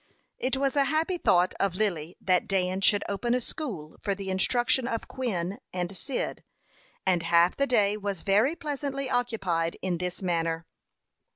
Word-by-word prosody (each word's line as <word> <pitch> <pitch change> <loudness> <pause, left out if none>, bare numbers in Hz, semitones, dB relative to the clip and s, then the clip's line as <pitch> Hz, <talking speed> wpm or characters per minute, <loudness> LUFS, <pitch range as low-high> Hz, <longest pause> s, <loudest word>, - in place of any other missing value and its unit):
It 260 +1 0
was 275 0 +1
a 280 -1 +4
happy 320 +5 0
thought 180 - +3
of 195 -3 +1
Lily 180 -5 -1
that 180 -2 +2
Dan 190 -1 0
should 205 0 +4
open 235 +5 0
a - - +2
school 225 - -5
for 200 -2 0
the 190 -1 -4
instruction 240 +6 +2
of 230 -3 -3
Quin 200 -6 -3
and 180 +1 -3
Cyd, 265 +7 -3 0.6
and 180 -2 +3
half 170 +1 +4
the 280 - +1
day 210 -4 +3
was 200 -3 -4
very 215 +11 +3
pleasantly 280 -3 -3
occupied 190 -9 0
in 180 -3 -2
this 180 +1 -3
manner. 165 -2 0
200 Hz, 165 wpm, -28 LUFS, 180-250 Hz, 0.6 s, a